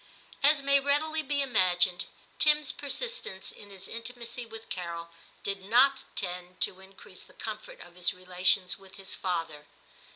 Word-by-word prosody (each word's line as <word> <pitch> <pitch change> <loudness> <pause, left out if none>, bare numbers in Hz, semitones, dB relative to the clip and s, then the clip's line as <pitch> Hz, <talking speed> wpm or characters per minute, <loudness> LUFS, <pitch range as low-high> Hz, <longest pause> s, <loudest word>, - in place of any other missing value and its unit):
As 285 0 +5
may 280 0 +5
readily 300 +3 +1
be 285 -1 +1
imagined, 185 -7 +3 0.3
Tim's 300 -2 +5
per 290 - -8
sistence 280 - -1
in 205 - -13
his 195 -1 -7
intimacy 235 +1 -5
with 225 0 -9
Carol 170 -2 -4 0.3
did 195 -1 -1
not 255 +7 +5
tend 180 0 -4
to 185 - 0
increase 190 0 -12
the - - -16
comfort - - -7
of - - -12
his 180 -1 +1
relations 185 +1 +1
with 195 0 -14
his 195 -1 -7
father. 165 -5 -3
200 Hz, 155 wpm, -30 LUFS, 180-275 Hz, 0.3 s, As